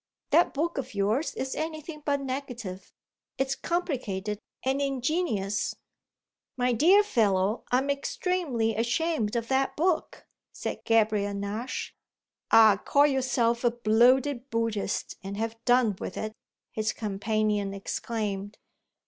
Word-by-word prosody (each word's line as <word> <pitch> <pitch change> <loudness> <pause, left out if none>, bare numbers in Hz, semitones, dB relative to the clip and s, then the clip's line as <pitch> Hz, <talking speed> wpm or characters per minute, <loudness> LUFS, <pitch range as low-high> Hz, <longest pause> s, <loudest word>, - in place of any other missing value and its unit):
That 335 +1 +4
book 325 +1 -1
of 255 -3 -6
yours 215 +10 0
is 265 0 -3
anything 310 -1 -5
but 285 -1 0
negative; 250 -8 -5 0.5
it's 270 0 0
complicated 230 - -2 0.2
and 270 +2 0
ingenious." 265 - -1 0.8
"My 250 0 +2
dear 365 - +6
fellow, 210 - +1
I'm 265 +3 +2
extremely 280 - -1
ashamed 235 -1 0
of 230 -1 -1
that 270 0 +1
book," 340 +1 0 0.3
said - - -5
Gabriel 215 -3 +2
Nash. 205 +5 -4 0.6
"Ah 220 -3 +7
call 285 +1 +4
yourself 250 -4 +1
a 240 - +5
bloated 240 +4 +3
Buddhist 225 -4 -2
and 195 +1 -6
have 225 +1 -4
done 245 -4 +4
with - - -5
it!" 215 0 -3 0.4
his 215 0 -1
companion 210 -1 -1
exclaimed. 205 0 -4
235 Hz, 120 wpm, -28 LUFS, 215-275 Hz, 0.8 s, Ah